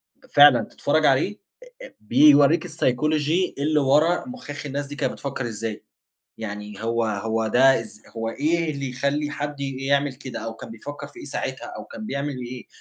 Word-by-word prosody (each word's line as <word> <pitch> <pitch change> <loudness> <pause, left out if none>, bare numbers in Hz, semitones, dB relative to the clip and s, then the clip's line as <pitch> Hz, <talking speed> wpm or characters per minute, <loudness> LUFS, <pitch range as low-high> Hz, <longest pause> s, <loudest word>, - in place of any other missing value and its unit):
ب - - -24
فعلًا 145 -5 +8
تتفرّج 155 +6 0
عليه 150 +11 +2 0.3
أ - - -13
أ - - -22
بيوريك 145 +8 +5
الPsychology 155 +3 +1
اللي 150 +1 +2
ورا 150 +6 +3
مُخاخ 160 - -8
الناس 140 0 -3
دي 145 - -8
كانت - - -1
بتفكّر 135 -3 -4
إزاي، 110 -1 -5 0.6
يعني 105 -1 -7
هو 115 0 +1
هو 110 +1 -1
ده 135 +4 +5
إز 110 -1 -12
هو 115 0 -2
إيه 160 +6 0
اللي 140 -2 -4
يخلّي 140 +3 -1
حد 145 -1 -5
ي 135 -1 -3
يعمل 140 -1 +2
كده 130 -1 -7
أو 115 0 -5
كان - - -10
بيفكّر 145 +6 -8
في 360 - -15
إيه - - -8
ساعتها؟ - - -4
أو - - -7
كان 220 - -9
بيعمل 140 -6 -3
إيه؟ 125 0 -8
140 Hz, 185 wpm, -24 LUFS, 115-150 Hz, 0.6 s, فعلًا